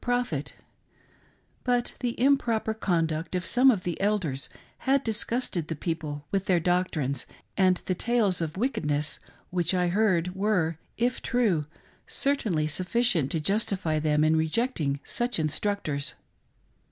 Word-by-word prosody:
f)het; 245 - -1 1.1
but 245 -1 +1
the 245 -2 -2
improper 240 -5 +2
conduct 165 -5 -1
of 180 - -1
some 255 +2 +5
of 205 -8 +2
the 175 0 -3
elders 185 -10 0 0.3
had 275 +1 +2
disgusted 225 -6 -1
the 160 - -3
people 150 -2 -4
with 195 -1 0
their 180 -2 +3
doctrines, 165 -6 0 0.3
and 185 -2 +3
the 185 - 0
tales 210 -2 +1
of 160 +1 -3
wickedness 150 - -1 0.3
which 175 0 +1
I 180 -1 +2
heard 180 -3 +2
were, 185 -5 0 0.2
if 245 +2 0
true, 210 - +1 0.4
certainly 220 - 0
sufficient 180 - +1
to 165 - +1
justify 185 -3 0
them 150 0 +2
in 155 +1 +4
rejecting 160 - 0
such 240 +1 -1
in 155 -2 +1
structors. 155 -5 -2
180 Hz, 135 wpm, -27 LUFS, 160-225 Hz, 1.1 s, some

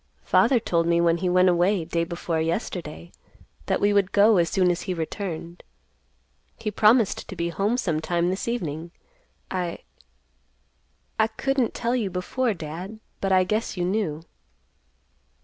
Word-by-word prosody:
Father 260 -3 +4
told 170 -5 0
me 170 0 +3
when 170 0 +3
he 180 +1 -1
went 180 +1 +4
away 180 0 +2
day 170 0 -1
before 170 -1 -2
yesterday 165 - -4 0.6
that - - +1
we 205 0 +3
would 200 -2 +2
go 210 +1 +5
as 170 -1 +2
soon 185 -3 +3
as 175 - -3
he 185 - 0
returned. 170 0 -5 1.0
He 215 - -3
promised 215 +1 +3
to - - -6
be 170 0 -2
home 200 +8 0
sometime 170 -3 0
this 190 - -4
evening. 170 -9 -3 0.6
I—I 185 +4 -7
couldn't 255 +2 -1
tell 240 +1 0
you 220 -6 -1
before, 205 +6 -1
Dad, 175 +7 -7 0.2
but 195 - -1
I 185 -1 +5
guess 210 +2 -2
you 175 - 0
knew." 180 -5 -1
180 Hz, 150 wpm, -25 LUFS, 170-210 Hz, 1.0 s, go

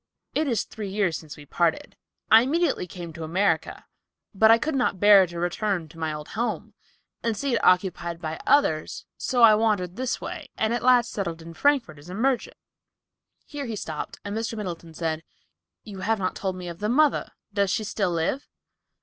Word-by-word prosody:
It 310 0 0
is 235 -5 +1
three 210 -3 -7
years 190 -4 0
since 155 -3 -8
we 145 - -12
parted. 170 +2 -1 0.4
I 220 +1 +9
came 250 - -1
immediately 325 - +1
to 170 -2 -8
America, 185 +6 0 0.5
but 220 +2 +5
I 225 - +8
could 310 +7 -2
not 250 -8 0
bear 205 -2 +7
to 170 0 -9
return 175 0 -1
to 165 +1 -14
my 160 -1 -1
old 150 0 -7
home, 235 +3 -3 0.5
and 230 -2 -1
see 275 +1 -1
it 230 - 0
occupied 180 -2 +2
by 160 -1 -5
others, 160 - +2
so 245 -2 +1
I 220 -2 +9
wandered 210 -4 +1
this 255 -1 -2
way - - -7
and 220 +1 +1
at 240 - -1
last 245 -1 +4
settled 170 -5 -4
in 165 0 -10
Frankfort 235 - +1
as 150 +5 -14
a 180 - -6
merchant." 255 +3 0 0.9
Here 285 -3 -6
he 225 - -4
stopped 155 -6 -6
and 205 +1 -4
Mr. 225 0 -3
Middleton 170 -5 -6
said, 160 -1 -2 0.6
"You 200 -3 -9
have 220 +3 0
not 185 -2 -2
told 190 -2 -3
me 180 -1 -7
of 170 -1 -7
the 210 +1 -1
mother. 295 +4 +2 0.2
Does 200 -1 +1
she 215 +3 0
still 200 -2 -1
live?" 170 +11 -1
200 Hz, 195 wpm, -25 LUFS, 170-230 Hz, 0.9 s, I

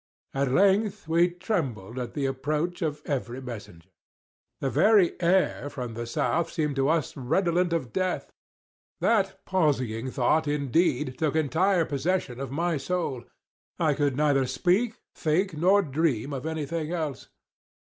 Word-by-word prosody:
At 135 -1 0
length 200 +3 +2
we 170 +2 +4
trembled 135 - -3
at 125 - -5
the 145 -2 -1
approach 150 +7 -2
of 150 -2 -2
every 125 -3 -3
messenger. 105 -9 -9 0.7
The 135 - -1
very 210 -5 +5
air 175 -4 +2
from 125 -5 -5
the 120 +1 -5
South 165 +7 0
seemed 150 -4 -1
to 135 +1 +2
us 160 -2 0
redolent 170 +6 +1
with 155 -8 -2
death. 185 -1 -1 0.7
That 195 -3 +1
palsying 130 - 0
thought, 140 +5 +1
indeed, 145 -1 +1
took 155 -2 0
entire 165 +4 +2
possession 145 -3 -1
of 135 -2 -4
my 165 +4 0
soul. 140 -6 -2 0.5
I 155 -3 +2
could 140 -2 0
neither 145 -3 +3
speak, 185 - +1 0.2
think, 175 +4 0
nor 190 +6 +4
dream 145 - 0
of 135 +3 -4
any 160 -2 -2
thing 160 +1 -3
else. 155 -5 -4
155 Hz, 145 wpm, -27 LUFS, 135-175 Hz, 0.7 s, very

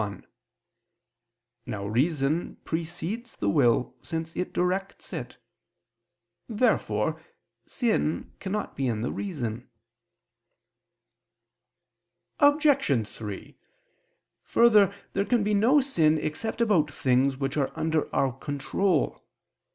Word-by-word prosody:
Now 105 -4 -4
reason 140 +7 0
precedes 175 +8 -4
the 100 - -1
will, 120 +3 +3
since 160 0 -5
it 180 - -2
directs 190 +2 -2
it. - - -6 1.1
Therefore 230 +3 +1 0.5
sin 220 -10 -1
cannot 205 +2 -3
be 135 -1 -1
in 110 -2 -1
the - - -1
reason. 125 - -4 2.7
Obj. 285 - +4
3: 105 -4 -8 0.9
Further, 215 -4 +5 0.2
there 195 - +1
can 235 0 +2
be 210 +1 +1
no 235 +8 +5
sin 165 - +2
except 155 +10 -3
about 190 -10 +3
things 130 0 +2
which 135 0 -2
are 140 -3 0
under 160 -1 0
our 135 - +2
control. 145 +6 -1
160 Hz, 95 wpm, -27 LUFS, 135-210 Hz, 2.7 s, Further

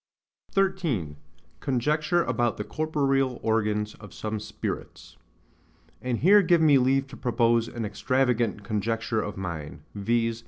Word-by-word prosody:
13. 170 - 0 0.4
Conjecture 150 +6 +1
about 120 -4 0
the 105 - -3
corporeal 135 -3 0
organs 105 -1 0
of 105 -3 -12
some 110 0 -3
Spirits. 110 - -6 0.9
And 125 -2 -1
here 200 +6 +7
give 175 -2 +4
me 145 -4 +6
leave 135 +2 +2
to 135 - -9
propose 115 -1 +2
an 115 -2 -4
extravagant 120 0 0
conjecture 110 +1 -1
of 105 -2 -5
mine, 85 -6 -6
viz. 115 +2 0
120 Hz, 125 wpm, -26 LUFS, 110-135 Hz, 0.9 s, here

